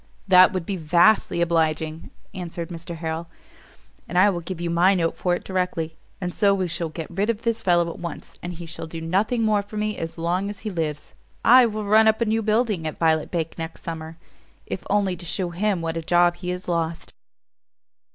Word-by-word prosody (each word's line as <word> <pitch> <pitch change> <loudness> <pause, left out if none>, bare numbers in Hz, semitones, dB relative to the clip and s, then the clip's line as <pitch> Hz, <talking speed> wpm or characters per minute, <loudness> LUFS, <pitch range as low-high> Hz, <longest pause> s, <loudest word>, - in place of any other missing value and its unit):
"That 185 +1 +7
would 185 -3 -3
be 195 +1 -3
vastly 170 +3 +3
obliging," 160 -1 0 0.2
answered 175 -2 -5
Mr 170 0 -7
Harrel, 160 0 -4 0.8
"and 175 - -2
I 200 +3 +6
will 175 - -3
give 170 +1 -6
you 170 -1 -2
my 180 +3 +4
note 165 -2 0
for 180 -1 0
it - - -7
directly. 180 -4 -2 0.2
And 180 -2 -3
so 200 -2 +3
we 185 -2 -1
shall 170 -1 -3
get 160 +1 -6
rid 195 +5 -1
of 230 0 -1
this 230 -1 0
fellow 175 -4 +3
at - - -10
once: 170 -1 -7
and 175 0 -5
he 170 0 -8
shall 165 0 -7
do 165 +1 -7
nothing 200 +8 0
more 215 -2 +3
for 205 +1 -9
me 210 0 -2
as 165 +1 -5
long 175 +4 -1
as 205 - -7
he 215 - -4
lives. 155 -4 -4 0.3
I 250 +1 +8
will 215 -1 -4
run 220 +2 +5
up 220 0 +3
a 230 - +2
new 220 +1 +1
building 215 -6 +1
at 155 - -5
Violet 160 -2 +2
Bank 165 -2 -3
next 165 0 -6
summer, 160 -1 -6 0.5
if - - -5
only 200 -2 +2
to - - -10
shew 175 +1 -3
him 190 0 0
what 165 0 -2
a - - -2
job 175 +1 +3
he 180 - -5
has 180 +1 -4
lost." 165 -1 -2
175 Hz, 215 wpm, -24 LUFS, 165-200 Hz, 0.8 s, I